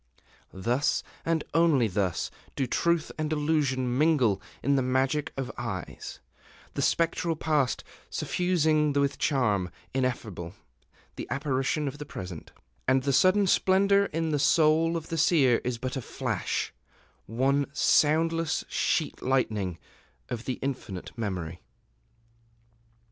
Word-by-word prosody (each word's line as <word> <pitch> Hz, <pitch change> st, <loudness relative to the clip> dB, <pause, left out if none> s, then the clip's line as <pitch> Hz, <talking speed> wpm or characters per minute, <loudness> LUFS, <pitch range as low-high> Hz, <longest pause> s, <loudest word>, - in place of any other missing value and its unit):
Thus, 120 Hz, +9 st, 0 dB, 0.2 s
and 165 Hz, -2 st, 0 dB
only 155 Hz, -7 st, +4 dB
thus, 95 Hz, -3 st, -1 dB, 0.2 s
do 135 Hz, -, 0 dB
truth 170 Hz, +4 st, +1 dB
and 155 Hz, 0 st, -1 dB
illusion 140 Hz, -5 st, +1 dB
mingle 130 Hz, -11 st, +3 dB, 0.2 s
in 140 Hz, +2 st, +3 dB
the 135 Hz, -, +3 dB
magic 130 Hz, +4 st, 0 dB
of 130 Hz, -1 st, -3 dB
eyes, 100 Hz, -8 st, -6 dB, 0.5 s
the -, -, -2 dB
spectral 165 Hz, 0 st, +1 dB
past 150 Hz, -4 st, 0 dB, 0.3 s
suffusing 155 Hz, -4 st, +1 dB
with 140 Hz, 0 st, +1 dB
charm 105 Hz, -, +1 dB, 0.2 s
ineffable 110 Hz, -9 st, -2 dB, 0.6 s
the -, -, -5 dB
apparition 140 Hz, +1 st, -1 dB
of 140 Hz, +1 st, -5 dB
the 150 Hz, -, -6 dB
present; 90 Hz, -, -8 dB, 0.4 s
and 130 Hz, 0 st, +3 dB
the 140 Hz, -, +1 dB
sudden 185 Hz, +9 st, +5 dB
splendor 200 Hz, +2 st, +4 dB
in 165 Hz, 0 st, -2 dB
the 150 Hz, -, +1 dB
soul 160 Hz, +3 st, +4 dB
of 160 Hz, -, -7 dB
the 165 Hz, -, -2 dB
Seer 145 Hz, -7 st, +4 dB
is 125 Hz, -1 st, -2 dB
but 130 Hz, +2 st, -4 dB
a 135 Hz, -, -2 dB
flash, -, -, -2 dB, 0.5 s
one 135 Hz, +5 st, +1 dB
soundless 165 Hz, +1 st, +2 dB
sheet -, -, 0 dB
lightning 105 Hz, -9 st, 0 dB, 0.5 s
of 120 Hz, -1 st, -5 dB
the 130 Hz, -, -2 dB
Infinite 125 Hz, -9 st, -5 dB
Memory. 90 Hz, -7 st, -4 dB
140 Hz, 125 wpm, -28 LUFS, 120-160 Hz, 0.6 s, sudden